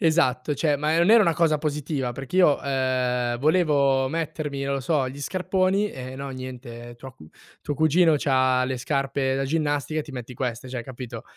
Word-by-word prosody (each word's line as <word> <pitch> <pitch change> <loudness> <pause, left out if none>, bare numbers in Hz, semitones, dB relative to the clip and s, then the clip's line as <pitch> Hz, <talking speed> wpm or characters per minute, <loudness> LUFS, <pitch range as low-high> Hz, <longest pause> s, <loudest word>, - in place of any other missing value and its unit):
Esatto, 150 -6 +2
cioè, 145 0 +1
ma 155 +3 0
non 170 +3 +3
era 230 -1 +7
una 170 -5 +2
cosa 165 -3 +2
positiva 145 -3 -2
perché 135 +7 -6
io, 175 -6 +5
ehm, 125 -3 0
volevo 140 -4 +2
mettermi, 155 -3 -3
non 140 0 -1
lo 135 - -2
so, 135 -2 0
gli 140 +2 -9
scarponi 185 +4 0
e 130 0 -8
no, 140 0 -6
niente, 120 -2 -8
tua 130 +1 -10
cu 75 -6 -16 0.3
tuo 145 - -3
cugino 160 +2 +4
c'ha 130 -2 +2
le 130 0 -2
scarpe 135 0 -1
da 135 - -1
ginnastica 150 0 -1
e - - -4
ti 150 - -12
metti 125 -1 -7
queste, 125 -1 -4
cioè 125 -2 -4
capito? 120 -2 -8
140 Hz, 190 wpm, -24 LUFS, 130-155 Hz, 0.3 s, era